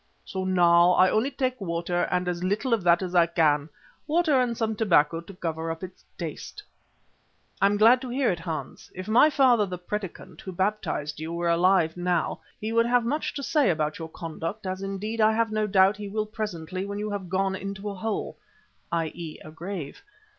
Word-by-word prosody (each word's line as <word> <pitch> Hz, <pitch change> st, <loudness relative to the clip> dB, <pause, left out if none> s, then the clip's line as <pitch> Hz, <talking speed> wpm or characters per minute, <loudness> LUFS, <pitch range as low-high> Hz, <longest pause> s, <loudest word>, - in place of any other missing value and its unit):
So 190 Hz, -1 st, -4 dB
now 175 Hz, -1 st, +5 dB
I 185 Hz, +1 st, +5 dB
only 220 Hz, +5 st, +2 dB
take 255 Hz, -3 st, -2 dB
water 175 Hz, -1 st, -1 dB
and 180 Hz, 0 st, 0 dB
as 175 Hz, 0 st, -2 dB
little 210 Hz, +7 st, 0 dB
of 225 Hz, -, +2 dB
that 175 Hz, +1 st, +4 dB
as 180 Hz, -1 st, -4 dB
I 170 Hz, -2 st, +5 dB
can, 155 Hz, -3 st, +2 dB, 0.4 s
water 310 Hz, -4 st, +3 dB
and 235 Hz, -2 st, -1 dB
some 220 Hz, -1 st, -1 dB
tobacco 165 Hz, -7 st, +3 dB
to 185 Hz, +4 st, -12 dB
cover 165 Hz, -2 st, -3 dB
up 165 Hz, +2 st, -5 dB
its 185 Hz, 0 st, -9 dB
taste." 165 Hz, -4 st, -7 dB, 1.0 s
"I 195 Hz, -, +6 dB
am 205 Hz, +1 st, +1 dB
glad 235 Hz, +4 st, +6 dB
to 260 Hz, -, -6 dB
hear 255 Hz, -1 st, +1 dB
it, 175 Hz, -, -3 dB
Hans. 165 Hz, -2 st, -6 dB
If 185 Hz, +1 st, -6 dB
my 235 Hz, +8 st, +6 dB
father, 250 Hz, -8 st, +4 dB
the 180 Hz, -1 st, -5 dB
Predikant 190 Hz, +1 st, -6 dB
who 190 Hz, -, -7 dB
baptised 185 Hz, -6 st, -2 dB
you, 160 Hz, +1 st, -5 dB
were 170 Hz, 0 st, -1 dB
alive 170 Hz, -1 st, +3 dB
now, 175 Hz, -1 st, 0 dB, 0.2 s
he 220 Hz, +1 st, -3 dB
would 230 Hz, 0 st, +3 dB
have 245 Hz, -1 st, +2 dB
much 295 Hz, +6 st, -2 dB
to 280 Hz, -, -4 dB
say 295 Hz, -3 st, +2 dB
about 155 Hz, -2 st, -1 dB
your 160 Hz, 0 st, -6 dB
conduct 165 Hz, +6 st, -6 dB
as 185 Hz, 0 st, -3 dB
indeed 200 Hz, +3 st, -3 dB
I 215 Hz, 0 st, +5 dB
have 225 Hz, 0 st, +1 dB
no 215 Hz, 0 st, 0 dB
doubt 195 Hz, 0 st, +4 dB
he 205 Hz, -1 st, -6 dB
will 215 Hz, +1 st, -1 dB
presently 185 Hz, -4 st, -5 dB
when 200 Hz, +1 st, -5 dB
you 210 Hz, 0 st, -3 dB
have 195 Hz, -3 st, -5 dB
gone 190 Hz, +1 st, 0 dB
into 195 Hz, +1 st, -6 dB
a 205 Hz, -, -3 dB
hole 210 Hz, +2 st, -4 dB, 0.5 s
(i.e., 165 Hz, -1 st, -3 dB
a 155 Hz, -, -9 dB
grave). 165 Hz, -2 st, -6 dB
190 Hz, 205 wpm, -26 LUFS, 170-215 Hz, 1.0 s, I